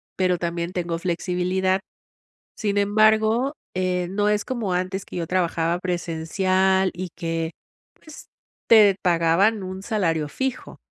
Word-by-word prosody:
pero 185 -1 +1
también, 170 0 -3
tengo 170 -2 -2
flexibilidad. 185 +2 0 0.7
Sin 205 -2 -1
embargo, 215 +5 +3 0.2
eh, 180 -1 -1
no 205 +2 +1
es 210 0 0
como 230 -7 -2
antes 185 +2 -2
que - - -9
yo 170 -2 -3
trabajaba 170 -1 0
presencial, 185 +2 +1
y 180 0 -5
que, 165 -1 -3 0.5
pues, 310 -3 -13 0.4
te 210 -4 +7
pagaban 180 +4 +2
un 185 +1 -6
salario 165 -8 -1
fijo. 265 - -4
185 Hz, 125 wpm, -23 LUFS, 175-205 Hz, 0.7 s, te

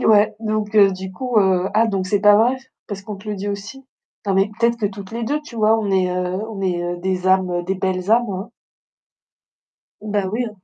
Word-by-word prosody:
Eh - - -3
ouais, 215 0 +5
donc 215 -1 -2
heu, 200 -2 +6
du 190 0 -6
coup, 245 +3 0
heu 190 -2 +2
ah, 225 +2 +4
donc 195 -4 -1
c'est 200 +1 +1
pas 205 0 +7
vrai? 245 +4 +3 0.3
Parce 200 -1 -6
qu'on 210 0 -7
te 200 +3 -15
le 210 - -2
dit 200 +2 -4
aussi? 205 +7 -6 0.4
Non, 195 - +1
mais 195 +2 +2
peut-être 235 0 +3
que 220 -3 0
toutes 200 0 -8
les 230 0 -3
2, 295 +6 -1
tu 255 -6 -12
vois? 220 0 +3
On 210 -3 -2
est, 185 -1 +2
heu 180 +2 -2
on 205 - -6
est 180 -2 -1
heu, 175 0 -3
des 185 0 -2
âmes 185 -2 +2
des 190 +2 -1
belles 185 0 -2
âmes, 235 -1 +3
hein. 195 +4 -5 1.5
Bah, 205 -2 -1
oui 235 +4 -1
heu 235 - -3
200 Hz, 235 wpm, -20 LUFS, 190-220 Hz, 1.5 s, pas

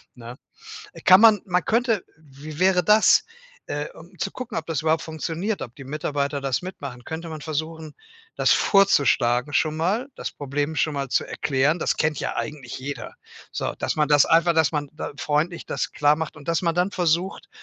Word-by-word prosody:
ne? 120 0 -10 0.6
Äh, - - -12
kann 185 +2 +7
man 220 -2 +7
man 180 -2 0
könnte 230 -3 +1
wie 150 0 -11
wäre 185 -1 +3
das? 210 +5 +5 0.4
Äh, 145 +1 -3
um 175 +3 -15
zu 195 +2 -3
gucken, 250 -4 -6
ob 160 - -3
das 165 -3 -2
überhaupt 160 0 +1
funktioniert, 165 +6 -3
ob 120 -1 -7
die 140 - -10
Mitarbeiter 145 0 -2
das 135 -2 -1
mitmachen, 140 -9 -8
könnte 160 +5 -6
man 155 -2 -7
versuchen, 155 0 -5 0.4
das - - +4
vorzuschlagen, 140 -9 +3
schon 155 +1 +1
mal, 195 - 0
das - - -5
Problem 145 +2 -3
schon 155 - +1
mal 140 -2 -3
zu - - +1
erklären. 145 +3 0
Das - - -1
kennt 155 -2 0
ja - - -3
eigentlich 140 -6 -5
jeder. 140 +2 -6 0.4
So, - - -3
dass - - -2
man 150 -1 +2
das 145 -1 +5
einfach 170 +1 +4
dass 160 -2 +3
man 145 -2 -2
da 155 - -6
freundlich 155 +4 -1
das - - -3
klar 145 0 +3
macht. 160 0 -5
Und 145 - -14
dass 165 -1 +1
man 170 -2 0
dann 180 +3 +1
versucht, 175 +1 -1
155 Hz, 195 wpm, -24 LUFS, 145-175 Hz, 0.6 s, kann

